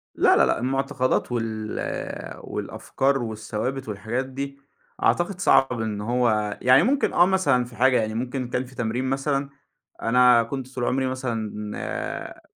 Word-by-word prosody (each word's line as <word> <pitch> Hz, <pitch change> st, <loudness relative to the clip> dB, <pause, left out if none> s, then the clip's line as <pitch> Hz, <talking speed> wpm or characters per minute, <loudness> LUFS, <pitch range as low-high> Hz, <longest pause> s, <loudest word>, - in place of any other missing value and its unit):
لا، -, -, +5 dB
لا، -, -, +5 dB
لأ، -, -, +1 dB
المُعتقدات 130 Hz, 0 st, 0 dB
وال 110 Hz, -2 st, -4 dB
والأفكار 135 Hz, +1 st, -1 dB
والثوابت 110 Hz, +4 st, -4 dB
والحاجات 115 Hz, +5 st, -3 dB
دي، 140 Hz, +1 st, -6 dB, 0.4 s
أعتقد 175 Hz, +2 st, +1 dB
صعب 135 Hz, -, +3 dB
إن 105 Hz, -2 st, -3 dB
هو 110 Hz, -2 st, +1 dB
يعني 130 Hz, +2 st, +6 dB
ممكن 275 Hz, +3 st, +1 dB
آه، 175 Hz, -, +6 dB
مثلًا 160 Hz, -10 st, +2 dB
في 120 Hz, -1 st, -13 dB
حاجة 125 Hz, +1 st, +4 dB
يعني 110 Hz, 0 st, -1 dB
ممكن 125 Hz, +2 st, -3 dB
كان 125 Hz, +1 st, -2 dB
في 130 Hz, +1 st, -15 dB
تمرين 120 Hz, +2 st, -2 dB
مثلًا، 140 Hz, +1 st, -1 dB, 0.5 s
أنا 125 Hz, 0 st, +5 dB
كنت 130 Hz, +2 st, -6 dB
طول 125 Hz, -, -2 dB
عمري 130 Hz, 0 st, +1 dB
مثلًا 110 Hz, -5 st, -4 dB
125 Hz, 145 wpm, -24 LUFS, 115-135 Hz, 0.5 s, يعني